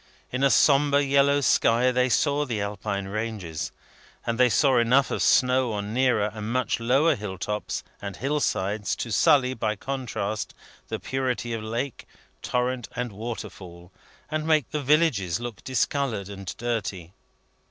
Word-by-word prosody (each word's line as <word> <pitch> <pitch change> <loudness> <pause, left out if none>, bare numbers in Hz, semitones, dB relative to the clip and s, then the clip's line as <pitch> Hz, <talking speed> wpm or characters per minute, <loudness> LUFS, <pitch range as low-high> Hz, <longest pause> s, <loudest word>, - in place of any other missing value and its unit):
In 130 - -2
a 140 - +5
sombre 140 0 +4
yellow 140 +1 +3
sky, 125 -1 +3
they 125 +1 +2
saw 145 +3 +2
the 120 -7 -3
Alpine 100 -1 -3
ranges; 105 -6 -4 0.5
and 115 +1 -2
they 125 -1 +6
saw 130 0 +4
enough 125 +4 +3
of - - -1
snow 125 -2 +3
on 105 +1 -4
nearer 120 -5 +2
and 110 0 -5
much 130 0 0
lower 135 +7 +3
hill 100 -4 -6
tops 105 +4 -3 0.2
and 100 -2 -5
hill 140 +6 -1
sides, 105 -4 -1
to 115 - -5
sully, 130 +3 +4
by 110 -3 -1
contrast, 110 -5 -4 0.3
the - - -4
purity 130 -3 -2
of 115 - -3
lake, 115 +4 -4 0.3
torrent, 125 -1 -1
and 125 -1 -3
waterfall, 95 -5 -8 0.4
and 155 0 -2
make 155 -5 +2
the 150 - -2
villages 135 - +2
look 120 -3 -7
discoloured 130 -6 -1
and 100 0 -7
dirty. 100 -7 -3
120 Hz, 150 wpm, -25 LUFS, 105-135 Hz, 0.5 s, they